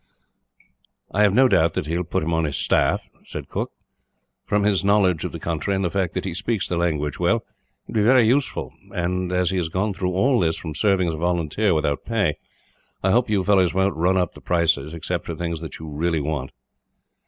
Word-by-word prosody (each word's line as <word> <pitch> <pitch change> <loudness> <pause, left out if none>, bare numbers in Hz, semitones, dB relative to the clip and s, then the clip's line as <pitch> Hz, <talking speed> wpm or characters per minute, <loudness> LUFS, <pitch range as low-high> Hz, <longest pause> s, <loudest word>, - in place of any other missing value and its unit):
"I 105 - +1
have 105 -2 +5
no 130 +2 +6
doubt 85 -7 +3
that - - -1
he 80 +2 -2
will 90 - 0
put 85 - -2
him 85 +2 -1
on 80 0 +1
his 70 -3 -2
staff," - - +1
he - - -30
said. - - -6 1.0
"From 105 0 +1
his 100 -2 +2
knowledge 100 -4 +3
of - - -3
the - - -7
country, 85 +4 -2
and 95 0 0
the 85 - -1
fact 95 -4 -1
that - - -2
he 95 - -3
speaks 105 +3 -1
the 90 - -2
language 75 -4 -1
well, - - +2 0.4
he - - -10
would 110 - +1
be - - +3
very 125 +1 +5
useful 130 +5 0 0.2
and, 90 +1 -1
as 90 0 +1
he 95 - -1
has 85 -3 -1
gone 100 +4 -1
through 90 -1 -2
all 125 +7 +3
this 80 -3 +1
from 80 -2 -6
serving 95 +1 +2
as - - -2
a - - -5
volunteer, 85 +3 +1
without 75 -2 0
pay, 100 -9 0 0.6
I 95 - +3
hope 120 +1 +2
you 100 -3 +1
fellows 95 -3 +3
won't 95 +1 +2
run 90 +4 +2
up 90 -2 0
the - - -14
prices, 80 -4 +1
except 85 +2 -4
for 85 - -4
things 85 0 -3
that 80 -3 -7
you 80 - -9
really 80 +2 -1
want." 75 +1 -3
90 Hz, 225 wpm, -23 LUFS, 80-100 Hz, 1.0 s, no